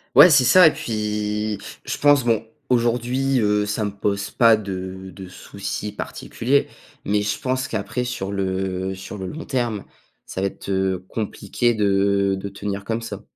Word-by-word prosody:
Ouais, 155 +5 +10
c'est 140 -3 +6
ça 180 +7 +7
et 155 - +6
puis 105 -1 -2 0.3
je - - -3
pense, 145 -2 +5
bon, 115 -2 +2 0.3
aujourd'hui, 125 +2 +1
heu, 105 -1 +2
ça 105 +1 -1
me 105 - -2
pose 100 0 -2
pas 115 -2 +5
de 95 -2 -6
de 95 +1 -9
soucis 100 +2 -5
particulier, 125 +5 -1 0.4
mais 105 0 +1
je 105 0 -2
pense 130 0 -1
qu'après, 115 +1 -2
sur 100 -5 -4
le 95 -1 -2
sur 95 +2 -8
le 95 - -4
long 160 - -7
terme, 120 -7 -2 0.4
ça 95 - -5
va 100 - +2
être, - - -9
heu, 95 -1 0
compliqué 115 +2 -1
de 100 -1 +2
de 100 +1 -5
tenir 100 0 -5
comme 115 +2 -2
ça. - - -6
105 Hz, 170 wpm, -22 LUFS, 100-120 Hz, 0.4 s, Ouais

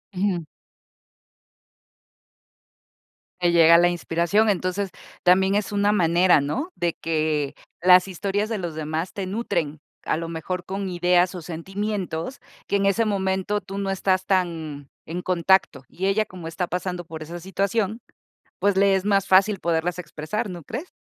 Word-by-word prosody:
Ujú. 185 -3 0 3.0
Te 175 -1 +3
llega 170 0 +7
la 175 +1 +5
inspiración, 175 +5 +1
entonces, 190 +1 -1 0.3
también 190 +2 +4
es 205 -1 -1
una 205 0 +2
manera, 175 -3 +4
¿no?, 270 - -3
de 170 -1 0
que 155 -3 0 0.3
las 180 +1 +6
historias 200 +4 -2
de 225 - -1
los 175 -5 -5
demás 160 +3 -3
te 195 - -4
nutren, 170 -8 -2 0.2
a - - 0
lo 165 0 -4
mejor 170 +2 -4
con 195 0 -4
ideas 180 0 +2
o 180 - -6
sentimientos, 190 - -4 0.3
que - - 0
en 200 0 +2
ese 200 +3 +2
momento 190 0 0
tú 195 0 -8
no 195 -1 -1
estás 185 -1 +1
tan 165 -7 -1 0.2
en 170 +3 -4
contacto, 180 -5 +2
y 190 +3 -3
ella 210 +2 +2
como 175 -4 -8
está 175 +2 -3
pasando 180 0 -3
por 160 -1 -7
esa 170 +3 -7
situación, 200 +4 -1 0.6
pues 200 -1 +2
le 195 0 +4
es 190 0 0
más 200 -1 +2
fácil 195 +2 +4
poderlas 170 +1 -1
expresar, 170 +6 -4
¿no 175 -3 -7
crees? 275 - -6
185 Hz, 155 wpm, -24 LUFS, 170-200 Hz, 3.0 s, llega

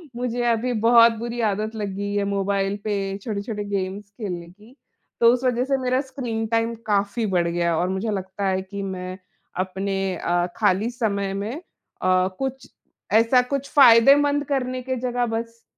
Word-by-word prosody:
मुझे 245 0 -2
अभी 235 +2 0
बहुत 230 0 +7
बुरी 235 +1 -4
आदत 215 +3 -3
लग 210 -2 -3
गई 205 0 -3
है 205 0 +1
मोबाइल 200 0 0
पे 210 -1 -1 0.3
छोटे-छोटे 210 -1 -4
गेम्स 200 0 -4
खेलने 180 -6 -6
की। 210 +7 -19 0.5
तो 230 0 +7
उस 250 +1 -2
वज़ह 250 -1 +1
से 275 0 +1
मेरा 255 +1 +1
स्क्रीन 245 -5 -4
टाइम 230 +1 0
काफ़ी 205 +2 0
बढ़ 170 -1 +2
गया 170 0 0
और 180 +2 0
मुझे 190 +4 -2
लगता 195 0 -3
है 190 0 0
कि 200 +1 -7
मैं, 185 -1 -5 0.4
अपने 190 +1 -2 0.2
अ, 175 +1 0
खाली 205 +1 +2
समय 200 -5 -1
में 205 +4 -3 0.5
अ, 185 0 +3
कुछ 265 0 -4 0.4
ऐसा 230 +3 +5
कुछ 280 0 -2
फ़ायदेमंद 285 +3 +6
करने 255 -1 -2
की 260 +1 -3
जगह 245 0 0
बस 230 0 -6
215 Hz, 165 wpm, -23 LUFS, 195-240 Hz, 0.5 s, बहुत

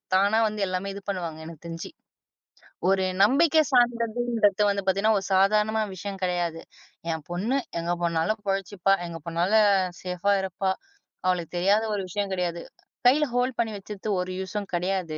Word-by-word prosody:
தானா 200 +3 +4
வந்து 210 -1 -4
எல்லாமே 185 +2 -3
இது 200 - -8
பண்ணுவாங்க, 170 -5 -3
எனக்குத் 165 0 -11
தெரிஞ்சு. 165 - -6 1.0
ஒரு 190 -1 +3 0.2
நம்பிக்கை 310 +7 +5
சார்ந்ததுன்றது 235 -3 +2
வந்து 200 -1 -1
பாத்தீங்கன்னா, 200 +3 +3
ஒரு 190 - -8
சாதாரண 215 +3 +3
விஷயம் 195 +1 -6
கெடையாது. 175 -2 -1 0.5
என் 160 -2 -4
பொண்ணு 220 +10 0 0.2
எங்க 170 +1 -2
போனாலும் 170 +6 0
பொழிச்சிப்பா. 195 0 +1
எங்க 165 -1 -7
போனாலும் 190 +6 +3 0.4
சேஃபா 180 +2 0
இருப்பா. 190 0 -1 0.6
அவளுக்குத் 180 -2 -1
தெரியாத 200 +5 +3
ஒரு 200 - -2
விஷயம் 200 +2 -2
கிடையாது. 175 -2 -2 0.5
கைல 295 +4 +5
ஹோல்டு 250 +1 +1
பண்ணி 230 -1 +1
வச்சுட்டு 200 +1 -8
ஒரு 180 0 -3
யூஸ்ம் 195 +2 -4
கெடையாது. 175 -2 -1
195 Hz, 145 wpm, -26 LUFS, 175-215 Hz, 1.0 s, நம்பிக்கை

